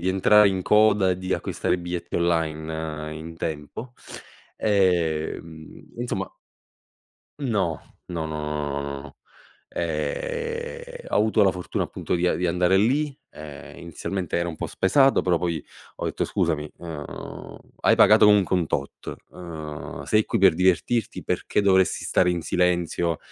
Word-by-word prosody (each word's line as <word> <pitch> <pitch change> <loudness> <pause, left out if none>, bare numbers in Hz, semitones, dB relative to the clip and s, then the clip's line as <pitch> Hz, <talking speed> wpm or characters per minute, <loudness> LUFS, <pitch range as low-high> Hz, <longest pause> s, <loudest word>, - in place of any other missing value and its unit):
di 90 - -1
entrare 105 +2 +5
in 95 -1 -1
coda 105 -2 +4
e 90 - -1
di 95 0 -1
acquistare - - -1
i - - +1
biglietti 90 0 -5
online 80 -2 -2
in 80 +1 -9
tempo, 80 +11 -5 0.7
ehm, 85 -5 -1
insomma 120 -5 -3 1.1
No. 105 - 0 0.3
No, 80 -2 -3
no, 75 -1 -4
no, 75 -2 -3
no, 70 - -5
no, 70 -2 -13 0.5
ehm, 470 - -4
ho - - 0
avuto 110 0 +3
la 95 - +5
fortuna 90 -1 -3
appunto - - -3
di 90 0 0
a - - +2
di 90 - 0
andare 90 +2 +3
lì, 140 +8 +2 0.2
ehm, 75 -2 -10
inizialmente 90 +2 -4
ero 85 0 0
un 85 - -5
po' - - -5
spaesato, 135 +8 +3
però 90 -2 +2
poi 85 -3 -2 0.3
ho - - -3
etto: - - -1
"Scusami, 75 -2 -1
uhm, 80 -4 -8 0.2
hai - - +4
pagato - - +7
comunque 105 -3 +5
un 85 -3 +1
tot, 70 0 -4 0.2
uhm, 80 -4 -7
sei 110 0 +3
qui - - -1
per 95 -3 +6
divertirti, 95 +6 +1
perché - - 0
dovresti 95 -2 +3
stare 90 - +3
in 85 -1 -2
silenzio 85 -1 +1
90 Hz, 150 wpm, -24 LUFS, 80-100 Hz, 1.1 s, pagato